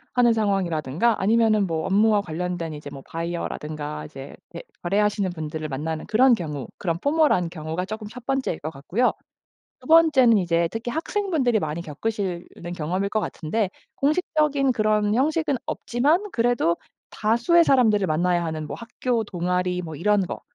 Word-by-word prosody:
하는 240 -2 +5
상황이라든가 195 - 0
아니면은 215 0 +3
업무와 205 +6 +2
관련된 175 -2 -4
이제 150 -1 -8
뭐 135 -1 -9
바이어라든가 155 -3 -4
이제 140 -2 -10
대 - - -9 0.2
거래하시는 200 +2 +1
분들을 155 -1 -5
만나는 155 +3 -4
그런 250 +4 +5
경우 150 - -3
그런 170 -3 -1
포멀한 285 - +2
경우가 160 +2 -4
조금 215 +1 -6
1 240 +2 -11
번째일 265 -11 -1
것 155 - -4
같고요. 170 - 0 0.7
2 255 - -14
번째는 295 -8 +6
이제 170 -3 +1
특히 225 +4 -4
학생분들이 320 - 0
많이 155 +1 -3
겪으실 180 +2 -3
는 175 +1 -6
경험일 180 +4 -2
것 215 - 0
같은데 195 +5 -2 0.3
공식적인 295 -3 +1
그런 215 -1 +2
형식은 300 +3 +1
없지만 295 - +1
그래도 230 -8 +2 0.4
다수의 235 +11 +3
사람들을 225 -9 +4
만나야 175 +2 +1
하는 160 -2 -4
뭐 - - -5
학교 235 0 -2
동아리 180 -1 -1
뭐 160 -3 -7
이런 205 +4 +2
거. - - -6
200 Hz, 360 characters per minute, -24 LUFS, 165-240 Hz, 0.7 s, 번째는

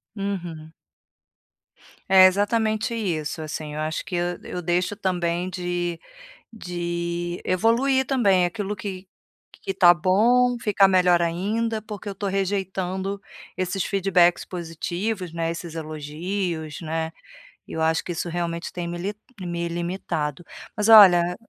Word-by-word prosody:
Uhum. 175 -6 -5 1.4
É, 190 -1 +9
exatamente 215 +4 +1
isso 165 -8 -2
assim, 155 -1 -5
eu - - -4
acho 155 +1 -2
que 180 - -5
eu 175 0 -1
eu 180 - -5
deixo 175 +3 0
também 180 -3 -1
de 175 -2 -3 0.5
de 175 -3 -4
evoluir 235 +8 +2
também 200 -9 +3
aquilo 205 +3 -4
que 190 -1 -7 0.5
que - - -3
está 175 -2 +6
bom, 235 +8 +3
ficar 205 -3 +4
melhor 180 -2 +4
ainda, 215 +7 -1
porque 210 -1 -8
eu - - -4
estou 200 +1 -3
rejeitando 190 0 -2 0.4
esses 185 0 -1
feedbacks 185 -3 +2
positivos, 175 +2 -4
né, 165 0 -1
esses 170 -1 -7
elogios, 160 +1 -4
né. 160 0 -3 0.6
Eu 160 - -4
acho 160 0 +2
que - - -5
isso 170 +1 -3
realmente 170 0 -3
tem 175 -1 -4
me 175 - -4
li 195 +4 -3 0.3
me 170 -1 -3
limitado. 170 -2 -3 0.3
Mas 210 +1 +1
olha 180 -5 +8
180 Hz, 130 wpm, -24 LUFS, 170-200 Hz, 1.4 s, É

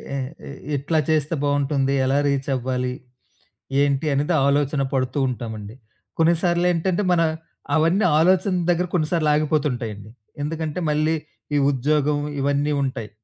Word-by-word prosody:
ఏ - - -1
ఏ 135 +4 -7 0.3
ఎట్లా 150 +3 0
చేస్తే 155 +1 +1
బావుంటుంది. 140 -1 +1
ఎలా 135 +2 +2
రీచ్ 140 0 -1
అవ్వాలి? 125 0 -2 0.9
ఏంటి? 140 +1 +1
అనేది 145 +5 +1
ఆలోచన 140 0 +1
పడుతుంటామండి. 125 -5 -2 0.4
కొన్నిసార్లెంటంటే, 175 +2 +2
మన 170 - +3 0.5
అవన్నీ 165 +6 +3
ఆలోచనల 185 +2 +3
దగ్గర 175 +1 +1
కొన్నిసార్లు 155 -2 +1
ఆగిపోతుంటాయండి. 125 -9 -1 0.3
ఎందుకంటే, 155 +1 -3
మళ్ళీ 155 +2 +1 0.4
ఈ - - +4
ఉద్యోగం 145 +2 +1 0.2
ఇవన్నీ 145 +2 +1
ఉంటాయి. 130 -5 -4
145 Hz, 115 wpm, -22 LUFS, 135-160 Hz, 0.9 s, ఈ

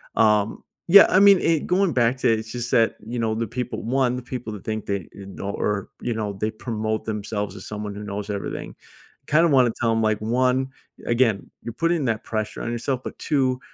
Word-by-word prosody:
Um, 105 -1 +2 0.3
yeah, 200 +2 +10
I 185 - +5
mean, 200 -1 +7
i 165 -2 +3
going 185 +1 +1
back 120 +1 +2
to 120 - +3
it, 110 - 0
it's 110 0 -8
just 120 0 -4
that, 115 -1 +3
you 120 +2 -4
know, 110 -1 0
the 115 +1 -1
people 125 +3 -4
1, 125 0 +1
the 125 - -6
people 125 -2 -6
that 100 - -9
think 110 -1 -4
they, 100 -1 -1 0.2
uh, - - -9
know 100 +1 -5
or, 105 -1 -2
you 120 - -1
know, 105 -2 -2
they 105 +3 -2
promote 110 -1 -3
themselves 105 -1 -3
as - - -9
someone 105 -1 -5
who 105 - -7
knows 105 0 -5
everything. 100 - -5 0.5
Kinda 165 +3 +4
wanna 130 -5 +4
tell 115 -1 +2
them, 115 0 +1
like, 110 -1 +1
1, 125 +4 +1 0.4
again, 120 -4 +1
you're 115 - -6
putting 165 -1 +1
that 115 -2 -1
pressure 110 -1 -4
on 120 - -3
yourself, 125 +2 -2
but - - -7
2, 130 -4 +1
115 Hz, 220 wpm, -23 LUFS, 105-130 Hz, 0.5 s, yeah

